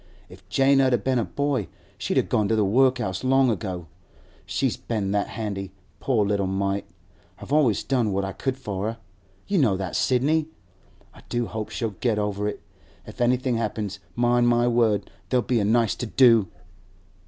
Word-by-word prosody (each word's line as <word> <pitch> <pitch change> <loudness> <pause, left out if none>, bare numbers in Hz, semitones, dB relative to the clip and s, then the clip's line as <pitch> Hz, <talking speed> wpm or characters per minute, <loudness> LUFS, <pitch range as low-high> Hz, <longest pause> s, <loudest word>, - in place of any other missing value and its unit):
If - - -16
Jane 135 0 +4
'ud 125 -5 +2
been 130 -2 +1
a - - +1
boy, 140 - -1 0.3
she'd - - -2
a - - +4
gone 105 -2 0
to 115 - +1
the 105 -2 +2
workhouse 125 -3 +2
long 130 -1 +4
ago. 95 -4 -4 0.6
She's - - 0
been 105 -4 -3
that 100 0 0
handy, 100 -4 -5 0.3
poor 115 -6 +1
little 100 -1 0
mite! 100 +1 -1 0.5
I've 140 - -7
always 135 -9 +3
done 120 -6 0
what 100 0 -1
I 95 - -4
could 130 +5 -3
for 100 -5 -4
her; 115 +1 -4 0.5
you 200 -3 +1
know 110 -10 +3
that, 95 -2 -4
Sidney. 150 +5 +2 0.7
I - - -15
do 120 0 -1
hope 110 -1 -5
she'll 115 -2 -3
get 115 -4 +1
over 105 0 -1
it. 105 - -5 0.4
If - - -9
anything 125 0 +2
happens, 105 -3 -3 0.2
mind 120 0 +3
my 120 0 +3
word, 115 -4 +1 0.2
there'll 125 -2 +2
be 120 -2 +1
a - - +1
nice 115 0 +2
to 120 - -4
do! 115 -4 +5
115 Hz, 180 wpm, -24 LUFS, 100-125 Hz, 0.7 s, do